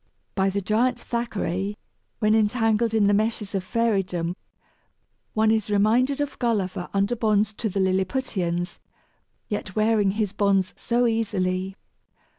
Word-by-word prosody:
By 195 0 +2
the 200 +1 -1
giant 225 +6 +1
Thackeray, 205 -4 -3 0.4
when 215 0 +2
entangled 225 +1 +2
in 215 -2 +4
the 205 - +4
meshes 215 -1 0
of 195 -2 -1
Fairydom, 190 -6 0 1.0
one 220 0 +4
is 220 -2 0
reminded 230 +7 +2
of 290 -1 -3
Gulliver 200 -6 -1
under 200 +4 +1
bonds 215 -2 +1
to 220 +1 -3
the 195 - -2
Lilliputians, 185 -2 -1 0.7
yet 205 -3 -4
wearing 215 -2 +2
his 210 -3 0
bonds 200 -2 +2
so 240 +1 +1
easily! 190 -5 -1
210 Hz, 130 wpm, -24 LUFS, 190-225 Hz, 1.0 s, in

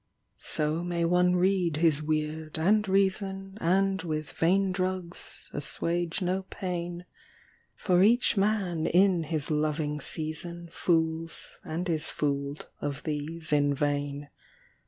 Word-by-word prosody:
So 155 +2 -1
may 170 -1 -1
one 180 +1 +3
read 180 -3 +2
his 155 -2 +3
weird, 155 0 -2
and 210 +6 +3
reason, 195 0 +1
And 190 +2 +2
with 155 -3 -4
vain 190 +3 +2
drugs 185 -1 -4
assuage 170 +5 -2
no 185 +2 0
pain. 175 -1 -4 0.7
For 180 -1 +2
each 235 +5 +4
man 195 -5 +1
in 180 -2 +3
his 155 -1 -1
loving 150 0 -1
season 170 +3 -3
Fools 165 -2 0
and 170 +3 -3
is 160 -3 +2
fooled 140 0 -2
of 140 -1 -4
these 155 +1 -1
in 145 -1 +3
vain. 145 0 -2
170 Hz, 120 wpm, -28 LUFS, 155-185 Hz, 0.7 s, each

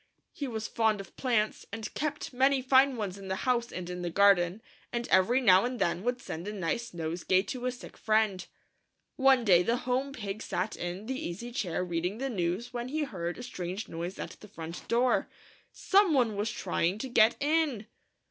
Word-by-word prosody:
He 285 - -5
was 225 -2 -4
fond 220 -2 +1
of 195 - -10
plants, 235 -5 0
and 220 +1 -6
kept 295 -2 -3
many 265 +2 +3
fine 260 +1 +4
ones 200 -3 -4
in 195 - -9
the 190 - -1
house 245 -2 +1
and 180 -1 -5
in 180 0 -5
the 175 - -2
garden, 195 +2 +4 0.3
and 240 0 -2
every 190 +7 +4
now 190 -7 +6
and 250 +1 -2
then 175 -4 0
would 245 +3 -1
send 170 -6 -6
a 210 - -4
nice 210 +5 -2
nosegay 175 +3 0
to 250 +5 -4
a - - +1
sick 245 - -11
friend. 215 -4 +1 0.7
One 265 -3 +4
day 180 -4 +6
the 230 +7 +1
home 260 +2 0
Pig 210 -5 -5
sat 190 +1 -2
in 175 +4 -5
the 260 +3 -3
easy 230 +8 -6
chair 185 -9 -2
reading 175 +3 -2
the 270 +2 -3
news 195 +5 -2
when 240 0 -3
he 305 +4 -1
heard 175 -10 -4
a 245 - -7
strange 185 -3 -5
noise 170 +3 -5
at - - -7
the 210 - -12
front 165 -3 -8
door. 245 +2 +2 0.4
Some 390 -5 +3
one 235 -5 +2
was 205 +2 -1
trying 180 -2 -1
to 265 - -4
get 235 -2 +5
in 295 -7 +1
220 Hz, 200 wpm, -30 LUFS, 185-250 Hz, 0.7 s, now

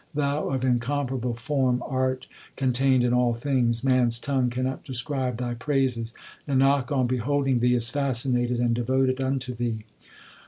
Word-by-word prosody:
Thou 145 0 0
of 130 -1 -1
incomparable 125 0 -1
form 125 0 0
art 130 -1 -1 0.3
contained 130 -1 +2
in 120 0 +2
all 125 -1 +2
things; 120 -2 0
Man 130 -2 +3
s 115 0 -1
tongue 130 0 0
cannot 130 +2 -3
describe 130 -2 -2
Thy 120 0 -3
praises; 125 -3 -1 0.4
Nanak 135 0 +2
on 130 -3 +2
beholding 130 +1 0
Thee 125 +1 +3
is 115 -1 +1
fascinated, 125 -3 +1
and 120 -1 +2
devoted 130 +2 +1
unto 130 -1 -2
Thee. 115 -2 -3
130 Hz, 150 wpm, -25 LUFS, 120-135 Hz, 0.4 s, Man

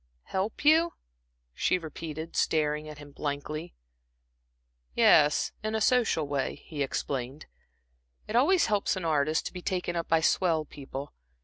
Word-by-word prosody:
"Help 195 +9 -3
you?" 325 +3 +5 0.6
she 185 - +1
repeated, 160 -1 -7
staring 150 -1 +1
at 150 - -9
him 145 -1 -12
blankly. 150 +3 -4 1.2
"Yes, 150 0 +5
in 215 0 -2
a - - +1
social 220 - +2
way," 140 -1 -1
he 150 -3 -8
explained. 135 0 -3 0.8
"It 215 - -4
always 335 +9 +4
helps 205 -2 +1
an 185 -2 -4
artist 155 0 +1
to - - -5
be 180 - -6
taken 180 -1 -2
up 170 -1 -2
by 165 0 +3
swell 160 -1 +2
people. 140 0 -8
160 Hz, 140 wpm, -28 LUFS, 145-190 Hz, 1.2 s, you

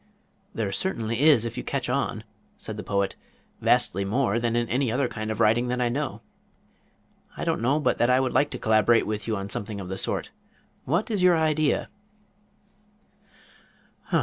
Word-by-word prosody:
"There 105 -3 -1
certainly 115 - -2
is 145 -7 +5
if 115 - -5
you - - -3
catch - - -2
on," - - -1 0.3
said - - -7
the - - -5
Poet. 100 -1 -1 0.5
"Vastly 100 +2 +2
more 115 +2 +1
than 120 -1 -1
in 120 0 +1
any 125 0 0
other 130 +2 +1
kind 110 -2 -5
of 110 0 -3
writing 115 +2 +3
that 125 0 -1
I 120 -1 +1
know. 140 +3 -3 1.2
I - - -4
don't - - 0
know 135 +6 +2
but 150 - 0
that 120 - +3
I 125 +1 +4
would 130 -1 0
like 145 - +3
to - - -5
collaborate 110 +1 +3
with 105 0 -4
you 110 - 0
on 100 +1 -6
something 105 +1 -4
of 95 -2 -7
the 95 0 -3
sort. - - -2 0.5
What 175 - 0
is 205 -4 0
your 180 -2 +5
idea?" 155 -1 +1
120 Hz, 180 wpm, -25 LUFS, 110-140 Hz, 1.2 s, is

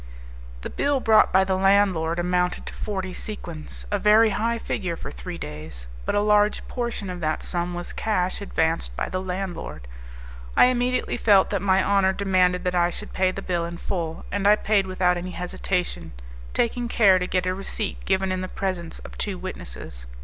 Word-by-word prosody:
The - - -6
bill 285 -1 +1
brought 220 -3 +5
by 190 +1 +5
the 190 0 0
landlord 190 -4 +3
amounted 180 0 0
to - - -7
forty 190 -3 -4
sequins, 170 -8 -6
a 205 - +1
very 215 +2 +5
high 230 +4 0
figure 185 -6 -3
for - - -7
three 60 0 -7
days; 75 -4 -7 0.2
but - - +1
a 205 - +3
large 210 0 +3
portion 235 -5 -3
of 180 - -6
that 155 -2 -1
sum 175 0 -2
was 175 0 -5
cash 185 -3 -1
advanced 160 - -1
by - - -2
the 185 - -2
landlord, 180 - -5 0.7
I - - +9
immediately 250 0 0
felt 200 -5 +4
that 200 -3 0
my 190 -1 +3
honour 195 -1 +3
demanded 185 -2 +2
that 180 -1 0
I 175 -1 +3
should - - -8
pay 185 0 +2
the 195 +1 -5
bill 175 -2 -1
in 170 0 -5
full; 170 -3 -4
and 200 0 +1
I 210 - +8
paid 205 -2 +1
without 180 -1 +2
any 180 +1 -5
hesitation, 180 - -3 0.4
taking 240 +1 0
care 200 -6 +5
to 180 - -2
get 185 0 0
a 185 - +1
receipt 195 +2 -3
given 190 0 +1
in 185 0 -1
the 185 - -3
presence 185 -3 -3
of - - -11
two 200 -3 -2
witnesses. - - -7
185 Hz, 190 wpm, -24 LUFS, 175-205 Hz, 0.7 s, I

